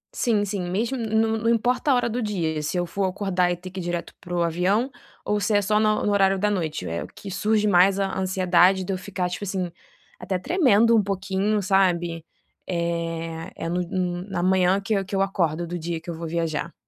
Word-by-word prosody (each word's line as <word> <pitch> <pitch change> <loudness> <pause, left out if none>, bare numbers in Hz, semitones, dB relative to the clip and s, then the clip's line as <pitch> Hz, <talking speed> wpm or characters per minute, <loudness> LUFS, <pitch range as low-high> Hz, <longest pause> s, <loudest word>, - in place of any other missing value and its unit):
Sim, 215 - +1
sim 200 -1 -3
mesmo 225 +8 -1
não 225 -1 +1
não 230 +1 +1
importa 245 +5 +1
a 260 - +5
hora 245 - +1
do 240 +2 -2
dia 165 -8 -1
se 150 +5 -2
eu 175 - 0
for 195 +3 -2
acordar 185 -2 0
e 175 - -2
ter 180 +1 -9
que 190 - -6
ir 180 - -4
direto 175 0 -4
para 175 - -11
o 175 - +2
avião 190 +10 +1 0.3
ou 210 0 +1
se 210 0 +1
é 205 - +3
só 210 +2 +2
no 215 0 +2
no 205 - +2
horário 195 -1 +3
da 210 +2 +1
noite 160 - -2
é 85 +1 -3
o - - -8
que 195 - -10
surge 210 +2 +1
mais 190 +1 +5
a 195 -1 -1
ansiedade 185 0 +3
de 195 - -3
eu - - -2
ficar 185 -1 -3
tipo 180 +3 -5
assim, 185 -3 -2 0.5
até 185 - -2
tremendo 230 - +4
um 220 - +5
pouquinho 195 +2 -1
sabe, 175 -4 +1 0.4
eh, 165 -1 -3
é - - -5
no 175 +1 0 0.5
na 180 -2 -2
manhã 185 +1 +3
que 200 +2 -2
eu 195 - +1
que 195 +1 -5
eu 195 - +2
acordo 175 -4 -1
do 175 +1 -5
dia 165 0 -3
que 170 +1 -7
eu - - -4
vou 165 0 -6
viajar. 165 0 -2
190 Hz, 230 wpm, -24 LUFS, 175-205 Hz, 0.5 s, a